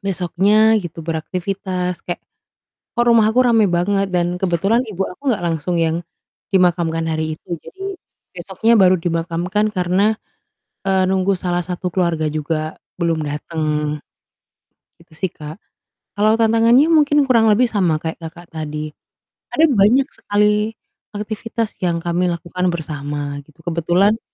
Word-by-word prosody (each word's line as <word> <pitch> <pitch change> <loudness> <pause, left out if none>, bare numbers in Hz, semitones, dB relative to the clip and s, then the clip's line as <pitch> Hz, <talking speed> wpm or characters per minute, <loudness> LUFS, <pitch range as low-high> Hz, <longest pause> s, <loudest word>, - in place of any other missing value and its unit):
Besoknya 200 +4 +3
gitu 165 -2 -7
beraktivitas 180 +2 -3
kek, 175 - -4 0.8
"Kok 240 - +4
rumah 225 -2 +5
aku 250 +3 +3
rame 225 -3 +4
banget?" 195 +3 +1
Dan 175 0 0
kebetulan 195 +6 +1
ibu 195 -4 -3
aku 180 - -12
nggak 200 - -2
langsung 170 +1 -1
yang 165 +1 0 0.5
dimakamkan 170 -3 +2
hari 155 0 -2
itu, - - -24
jadi 385 - -13 0.5
besoknya 190 +6 0
baru 185 -1 +6
dimakamkan 175 +5 -1
karena, 185 +4 +2 0.7
eee, 190 -1 +3
nunggu 190 +1 +2
salah 175 -1 -1
satu 180 0 -3
keluarga 165 -3 0
juga 155 +1 -3 0.2
belum 165 -2 0
datang, 150 0 -2 1.0
itu 170 -1 -21
sih, 185 +1 -2
Kak. 150 0 -9 0.6
Kalau 215 +2 +4
tantangannya 230 +6 +4
mungkin 295 -2 +4
kurang 230 -4 +4
lebih 230 +4 +4
sama 180 -7 +2
kayak 160 0 -3
Kakak, 170 +2 -10
tadi 155 -1 -5 0.6
ada 320 - +5
banyak 245 +3 +4
sekali 210 +1 +1 0.4
aktivitas 215 +1 -4
yang 170 -1 +1
kami 175 +1 0
lakukan 175 +2 -4
bersama 145 -2 -4
gitu 155 +1 -24
kebetulan 175 +6 +1
180 Hz, 135 wpm, -19 LUFS, 165-210 Hz, 1.0 s, baru